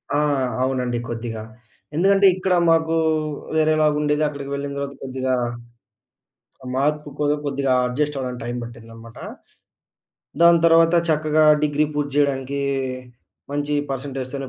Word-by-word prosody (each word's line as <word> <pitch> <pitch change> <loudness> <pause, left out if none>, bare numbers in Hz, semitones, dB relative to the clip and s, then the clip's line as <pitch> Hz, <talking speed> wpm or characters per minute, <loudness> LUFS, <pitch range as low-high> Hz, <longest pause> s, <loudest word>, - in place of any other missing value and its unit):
ఆ! - - +3 0.5
అవునండి 125 -2 -1
కొద్దిగా. 115 -1 -5 0.5
ఎందుకంటే 195 +4 +4
ఇక్కడ 185 0 0 0.2
మాకు 165 0 +2 0.6
వేరేలాగుండేది. 155 -1 +2
అక్కడికి 140 -2 -6
వెళ్ళిన 140 0 -4
తర్వాత 140 0 -4
కొద్దిగా 130 0 -2 1.4
మార్పు 150 +2 0
కూడా 150 0 +2
కొద్దిగా 140 -2 0
అడ్జస్ట్ 145 +4 -1
అవ్వడానికి 125 -2 -5
టైమ్ 120 +1 -4
పట్టిందనమాట. 115 0 -11 1.2
దాని 170 0 +7
తర్వాత 165 +1 +5
చక్కగా 155 0 +2 0.2
డిగ్రీ 150 0 +2
పూర్తి 145 -1 -2
జేయడానికి 140 -1 0 0.9
మంచి 145 +1 -2 0.2
పర్సెంటేజ్‌తోనే 135 0 -5
145 Hz, 110 wpm, -22 LUFS, 130-150 Hz, 1.4 s, దాని